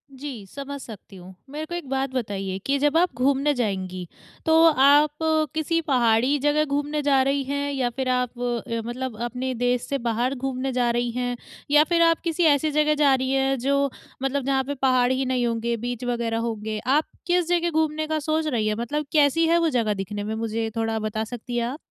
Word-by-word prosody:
जी, 260 -6 -7
समझ 280 0 -7
सकती 210 -3 -11
हूँ, 185 0 -12 0.2
मेरे 300 +2 -5
को 345 - -6
एक 345 -6 -6
बात 270 0 -1
बताइए 195 -6 -3
कि 280 +1 +1
जब 295 +2 +2
आप 355 -3 +2
घूमने 275 +3 +2
जाएँगी, 190 -6 -3 0.4
तो 320 - +3 0.2
आप 290 +2 +5 0.5
किसी 325 +2 0
पहाड़ी 250 +1 +3
जगह 295 +2 +2
घूमने 290 +1 -1
जा 275 -2 +4
रही 275 +1 +1
हैं? 285 +1 -2
या 255 -3 0
फिर 255 +2 -3
आप 250 -1 -1
अ, 235 -1 -2
मतलब 245 -1 -5
अपने 255 +2 -3
देश 245 +1 +1
से 280 - -1
बाहर 240 +2 -1
घूमने 265 0 -3
जा 245 -1 +1
रही 240 0 -1
हैं 245 0 -2 0.4
या 295 +1 +7
फिर 340 -1 +3
आप 330 0 +4
किसी 335 +1 0
ऐसी 300 0 +3
जगह 300 +1 +2
जा 290 -2 +4
रही 260 0 -2
हैं, 270 0 +1
जो 280 +2 +1 0.3
मतलब 270 0 0
जहाँ 270 -1 +1
पे 285 +2 -4
पहाड़ 255 -1 +3
ही 265 +1 0
नहीं 255 -1 0
होंगे, 235 0 -1
बीच 245 +1 -5
वगैरह 235 -2 -1
होंगे। 220 -2 -3
आप 295 +4 +3 0.2
किस 350 -1 +2
जगह 345 -1 +2
घूमने 310 -1 0
का 310 0 -1
सोच 310 +1 -1
रही 225 -6 0
हैं? 210 - 0
मतलब 280 +7 -3
कैसी 305 +2 +3
है 335 - +4
वो 335 -1 +2
जगह 230 -6 +1
दिखने 205 +1 -5
में? 220 +1 -3
मुझे 225 0 -2
थोड़ा 225 -1 -1
बता 215 0 -2
सकती 240 +2 -6
हैं 235 - +1
आप? 275 +5 -5
260 Hz, 210 wpm, -24 LUFS, 235-290 Hz, 0.5 s, या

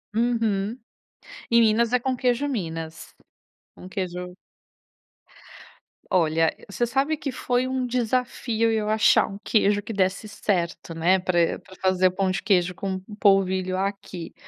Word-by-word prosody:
Uhum. 225 -2 0 0.7
Em 235 0 +6
Minas 230 +1 +3
é 250 - +4
com 260 +2 -1
o - - -2
queijo 250 +3 +1
minas. 165 - -5 0.6
Um 185 - -10
queijo 180 -2 -5 1.7
Olha, 165 -2 +2
você 240 +4 0
sabe 275 +6 0
que 280 -3 -4
foi 245 0 0 0.2
desafio 235 -2 0
eu 215 -1 0
achar 220 +1 +4
um 195 - -8
queijo 205 -2 +2
que 215 - -7
desse 195 +1 0
certo, 175 -5 -2
né. 175 +4 +3
Pra 175 -2 +1
pra 190 - -16
fazer 185 0 +3
o - - 0
pão 190 0 0
de - - -2
queijo 180 -4 +2
com 195 -1 -4
um 210 - -9
polvilho 190 -2 +2
aqui. 195 -3 -4
200 Hz, 145 wpm, -24 LUFS, 185-230 Hz, 1.7 s, Em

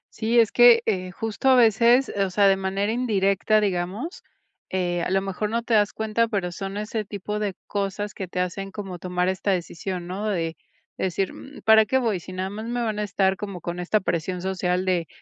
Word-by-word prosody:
Sí, 230 +2 +2
es 225 -2 +4
que, 240 -1 +7
eh, 185 -4 -1
justo 225 +7 -1
a 260 - +7
veces, 235 +2 +5
o 195 -1 +1
sea, 200 +2 +3
de 195 - +5
manera 195 +2 -1
indirecta, 215 -3 +2
digamos, 200 - -3 0.5
eh, 175 -2 -1
a - - -2
lo 195 0 +2
mejor 195 +2 -3
no 230 +2 -1
te 235 - -2
das 210 -1 +3
cuenta, 220 +1 0
pero, 195 -5 -2
son 195 +3 -5
ese 215 +1 -3
tipo 210 +1 -4
de 205 -3 -2
cosas 200 0 -3
que 190 - -6
te 180 - -4
hacen 195 +2 -3
como 195 -3 -7
tomar 180 0 -1
esta 190 +2 0
decisión, 180 0 -3
¿no? 195 +4 -4
De 165 -4 -2 0.4
decir, 190 +1 -1
mm, 280 +1 -12
¿para 220 0 +6
qué 260 +5 +1
voy, 225 -7 0
si 180 - -11
nada 185 +1 -3
más 215 +3 -6
me 240 +1 -2
van 215 -3 -2
a - - 0
estar 195 -1 +1
como 195 -3 -6
con 175 +2 -5
esta 180 +4 +1
presión 180 -1 -2
social 185 -1 -1
de 175 -3 0
195 Hz, 215 wpm, -24 LUFS, 185-220 Hz, 0.5 s, que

